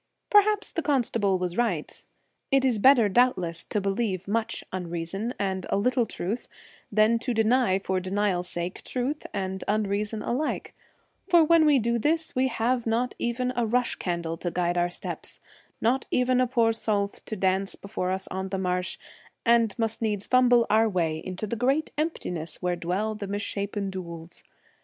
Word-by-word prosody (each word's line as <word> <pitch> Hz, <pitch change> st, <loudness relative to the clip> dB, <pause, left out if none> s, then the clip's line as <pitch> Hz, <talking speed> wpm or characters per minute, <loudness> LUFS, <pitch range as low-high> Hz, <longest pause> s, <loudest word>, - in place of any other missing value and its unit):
Perhaps 415 Hz, 0 st, +4 dB
the 330 Hz, -, -1 dB
constable 230 Hz, -, +1 dB
was 180 Hz, -1 st, -2 dB
right. 205 Hz, -11 st, -2 dB, 0.4 s
It 270 Hz, -1 st, +3 dB
is 240 Hz, -5 st, +2 dB
better 250 Hz, -1 st, +6 dB
doubtless 190 Hz, -7 st, +1 dB
to 210 Hz, -, -1 dB
believe 195 Hz, -1 st, -1 dB
much 225 Hz, +2 st, -1 dB
unreason 180 Hz, +6 st, -3 dB
and 190 Hz, -2 st, -2 dB
a -, -, +1 dB
little 240 Hz, +2 st, +2 dB
truth 210 Hz, +8 st, -4 dB, 0.4 s
than 215 Hz, +2 st, +4 dB
to 245 Hz, 0 st, -2 dB
deny 225 Hz, -2 st, +3 dB
for 190 Hz, -1 st, -1 dB
denial's 185 Hz, -1 st, -1 dB
sake 175 Hz, +2 st, -4 dB
truth 265 Hz, +4 st, -3 dB
and 190 Hz, -1 st, -3 dB
unreason 210 Hz, +1 st, -1 dB
alike, 275 Hz, +6 st, -2 dB, 0.6 s
for 345 Hz, -2 st, +7 dB
when 320 Hz, 0 st, +5 dB
we 290 Hz, -2 st, +6 dB
do 235 Hz, 0 st, +1 dB
this 320 Hz, +5 st, 0 dB
we 260 Hz, +1 st, +2 dB
have 240 Hz, 0 st, 0 dB
not 235 Hz, +2 st, 0 dB
even 250 Hz, +1 st, -1 dB
a 240 Hz, -2 st, +1 dB
rush 245 Hz, +2 st, +1 dB
candle 170 Hz, -2 st, -3 dB
to 175 Hz, -, -3 dB
guide 175 Hz, 0 st, 0 dB
our 175 Hz, 0 st, +2 dB
steps, 175 Hz, -, -5 dB, 0.4 s
not 245 Hz, +3 st, +1 dB
even 250 Hz, 0 st, +2 dB
a 255 Hz, -, +2 dB
poor 235 Hz, -2 st, +3 dB
sowlth 205 Hz, -3 st, -2 dB
to 220 Hz, -, -4 dB
dance 190 Hz, 0 st, 0 dB
before 200 Hz, -2 st, -4 dB
us 190 Hz, +1 st, -2 dB
on 190 Hz, +1 st, -4 dB
the 195 Hz, -, -2 dB
marsh, 180 Hz, -1 st, -1 dB, 0.5 s
and 230 Hz, -2 st, +3 dB
must 225 Hz, -1 st, -2 dB
needs 210 Hz, -3 st, -1 dB
fumble 245 Hz, -2 st, +5 dB
our 220 Hz, +1 st, +4 dB
way 165 Hz, -5 st, 0 dB
into 185 Hz, +3 st, -4 dB
the 215 Hz, -, -3 dB
great 270 Hz, +7 st, +1 dB
empti 315 Hz, -, -2 dB
ness 165 Hz, -2 st, -5 dB
where 180 Hz, -1 st, 0 dB
dwell 185 Hz, +6 st, -1 dB
the 210 Hz, -2 st, -6 dB
mis 205 Hz, +1 st, -3 dB
shapen 200 Hz, -1 st, -3 dB
dhouls. 170 Hz, -3 st, -8 dB
215 Hz, 175 wpm, -26 LUFS, 185-245 Hz, 0.6 s, for